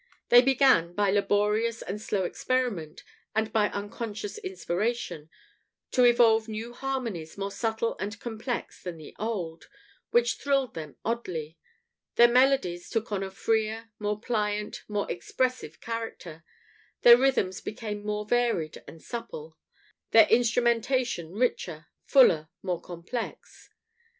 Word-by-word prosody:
They 245 - +9
began, 260 -10 +4
by 205 -1 +2
laborious 210 +3 +1
and 205 +3 -5
slow 200 -3 -1
experiment, 205 -6 -2 0.3
and 220 0 0
by 210 -2 +3
unconscious 205 - -5
inspiration, 220 - -3 0.6
to 250 - +4
evolve 230 -2 +5
new 225 +2 -5
harmonies, 240 -12 -4
more 200 0 -3
subtle 225 +1 -1
and 205 +2 -4
complex 235 +1 -5
than 180 -2 -6
the 155 - -12
old, 185 -7 -4 0.4
which 235 -1 +2
thrilled 275 -4 0
them 155 -3 -7
oddly; 175 -9 -3 0.6
their 240 - +8
melodies 245 -8 +2
took 225 -1 -2
on 200 -2 -1
a 195 - -3
freer, 220 +3 -1
more 210 0 -2
pliant, 210 -2 -2
more 205 -1 -1
expressive 250 -2 -2
character; 225 -8 -6 0.6
their 240 0 +11
rhythms 245 -8 +1
became 210 -2 -5
more 210 0 -2
varied 230 -9 0
and 165 - -12
supple, 165 -10 -7 0.5
their 225 -1 +8
instrumentation 235 -4 +2
richer, 180 -8 -1 0.2
fuller, 165 - +5
more 180 -3 -2
complex. 180 +7 -7
220 Hz, 125 wpm, -28 LUFS, 185-240 Hz, 0.6 s, their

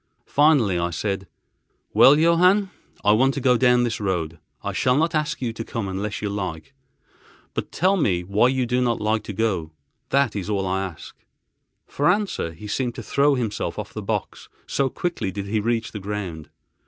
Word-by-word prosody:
Finally 140 - +3
I 85 0 0
said: 95 +3 -3 0.7
"Well, 140 +2 +7
Johann, 180 +5 +4 0.3
I 105 - +5
want 130 +5 +3
to - - -1
go 125 -1 +3
down 125 0 +4
this 120 - -1
road. 85 -5 -2 0.2
I - - -3
shall 125 +1 +2
not 165 +2 +1
ask 150 -3 -1
you 115 -2 -2
to 115 - -5
come 115 -3 -4
unless 100 +3 -4
you 105 - -1
like; 85 -7 -5 0.8
but - - -4
tell 190 +3 +2
me 90 - +1
why 100 +6 +3
you 130 -1 +1
do 125 +1 0
not 120 -2 +1
like 110 +1 0
to 105 - -5
go, 95 -7 -1 0.4
that 140 -6 +2
is 100 0 -4
all 100 -2 0
I 95 +1 0
ask." 90 -5 -8 0.7
For 145 +4 0
answer 195 - 0
he 90 +6 -11
seemed 120 +3 -2
to 115 - -7
throw 140 +5 +2
himself 115 -5 -3
off - - -6
the - - -5
box, - - -4 0.2
so 135 -1 0
quickly 165 - -3
did 100 +1 -5
he 110 +2 0
reach 115 +1 -1
the 105 - -6
ground. 95 -6 -5
110 Hz, 190 wpm, -23 LUFS, 95-135 Hz, 0.8 s, Well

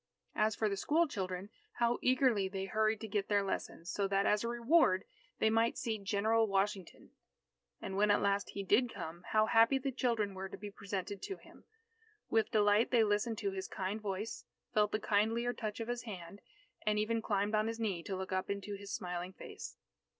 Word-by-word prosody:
As 215 0 +2
for 215 - +1
the 200 -1 -1
school 320 +11 +2
children, 190 -5 -4 0.2
how 235 0 +1
eagerly 255 -6 +3
they 195 0 -3
hurried 215 +1 +1
to 220 - -4
get 205 -1 -1
their 205 -1 +3
lessons, 175 -3 -4
so 200 -1 0
that 195 0 +1
as 210 +1 +3
a - - -1
reward, 235 - +3 0.3
they 220 - +3
might 225 +1 +2
see 225 -4 -2
General 215 +3 +2
Washington. 195 -2 -2 0.7
And 190 - -5
when 210 +1 +3
at 205 - +5
last 200 0 +1
he 200 - -4
did 230 +5 +3
come, 170 -3 -7
how 215 0 +5
happy 230 +4 +5
the 270 +1 -2
children 230 -5 0
were 190 0 -5
to - - -8
be 205 0 -7
presented 200 0 -5
to 390 - -5
him. - - -18 0.7
With 225 -1 +3
delight, 210 +1 +4
they 235 -3 +5
listened 210 +2 +1
to 200 - 0
his 190 0 -4
kind 195 +3 -3
voice, 205 +2 -4 0.3
felt 210 -1 +3
the 215 - 0
kindlier 225 +4 +1
touch 215 -3 -4
of 225 - -3
his 240 0 -2
hand, 200 -4 -8 0.4
and 215 -1 +1
even 225 +2 +1
climbed 205 0 0
on 215 0 +2
his 225 0 -3
knee 200 -7 -1
to 190 +3 -4
look 190 0 -5
up 185 0 -1
into 200 +1 -3
his 200 0 -8
smiling 180 +1 -4
face. - - -9
210 Hz, 200 wpm, -34 LUFS, 195-225 Hz, 0.7 s, at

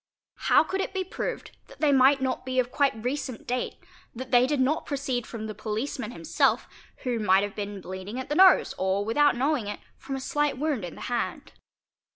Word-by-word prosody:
How - - +7
could 380 +4 -2
it 385 - -4
be 380 - 0
proved 370 - -5
that - - -16
they 300 -2 +3
might 270 0 +5
not 260 -1 -1
be 255 0 -4
of 250 -1 +1
quite 275 -7 +1
recent 260 -2 -3
date, 250 0 -2 0.4
that 255 +2 -7
they 245 +1 +5
did 295 -1 0
not 275 +5 +1
proceed 270 -4 -2
from 220 -2 -6
the 215 - -5
poiceman 215 +3 -4
himself, 165 -6 +1 0.4
who 245 -3 -1
_ - - -3
might 190 0 +4
have 205 -1 -4
been 205 -1 -5
bleeding 190 +6 -6
at 260 - -5
the - - -2
nose 375 +3 +6
or, 190 +2 0
without 290 +5 +3
knowing 260 -3 0
it, 205 - -5 0.2
from 270 0 -5
a - - -3
slight 295 +1 0
wound 290 -6 -1
in 175 - -6
the - - -11
hand. 240 -1 -3
255 Hz, 210 wpm, -27 LUFS, 215-280 Hz, 0.4 s, How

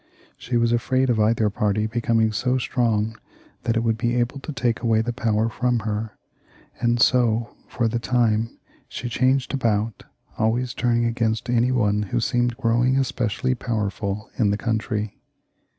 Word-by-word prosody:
She 120 -1 -2
was 115 0 +2
afraid 130 +2 +2
of 115 - 0
either 110 0 +3
party 105 +1 0
becoming 115 -1 +1
so 125 +4 0
strong 110 -4 0 0.4
that 115 0 0
it - - +2
would 115 -1 0
be 120 +1 0
able 125 +3 0
to 145 - -6
take 120 -5 0
away 115 -2 +2
the 120 +1 -2
power 110 -2 +1
fix)m 120 0 0
her, 110 0 -3 0.6
and 120 0 +1
so, 115 -1 +2
for 115 - -1
the 115 +1 -1
time, 115 -2 +1 0.3
she 120 - -5
changed 130 +3 +1
about, 115 -5 -1 0.3
always 120 +3 +1
turning 120 -2 +1
against 115 +1 -1
any 120 +1 +3
one 105 -4 +2
who 105 +4 -1
seemed 120 0 0
growing 125 +2 +2
specially 125 0 -1
powerful 105 -3 -3
in 105 -4 +3
the 100 - +1
country. 110 -1 -2
115 Hz, 160 wpm, -23 LUFS, 110-120 Hz, 0.6 s, either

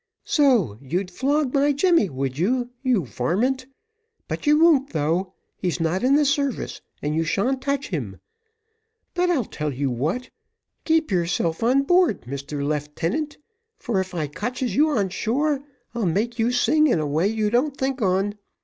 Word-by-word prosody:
"So, 235 - +2
you'd 180 +7 -3
flog 275 +5 0
my 285 0 +3
Jemmy, 330 - +3
would 135 -1 -3
you, 245 - 0
you 250 - +1
varmint? 235 - -1 0.6
But - - -5
you 300 +1 +6
won't 305 -5 +5
though; 170 +5 -1 0.2
he's 180 -2 -2
not 165 +3 0
in 265 +2 +4
the 295 0 +4
service, 280 -2 -1 0.2
and 150 +1 -1
you 160 +1 +1
sha'n't 245 +11 0
touch 280 +1 -2
him; 115 - -4 0.9
but 360 0 +1
I'll 285 -10 +1
tell 150 -5 -4
you 135 0 -1
what, 155 - -2 0.5
keep 320 -5 +2
yourself 170 -2 0
on 255 +4 +3
board, 355 - +3
Mr 140 +3 -5
Leeftenant, 160 - -2 0.4
for 220 -5 -1
if 185 -1 -4
I 160 -3 -1
cotches 245 - -3
you 305 +3 +4
on 205 -10 +1
shore, 275 +9 0 0.3
I'll 235 -5 -1
make 225 +8 -1
you 230 +2 +2
sing 305 +5 +3
in 240 - +2
a 155 - -1
way 155 +6 +1
you 215 -1 0
don't 265 +4 +1
think 265 -1 -2
on. 195 +1 +1
225 Hz, 165 wpm, -23 LUFS, 165-275 Hz, 0.9 s, you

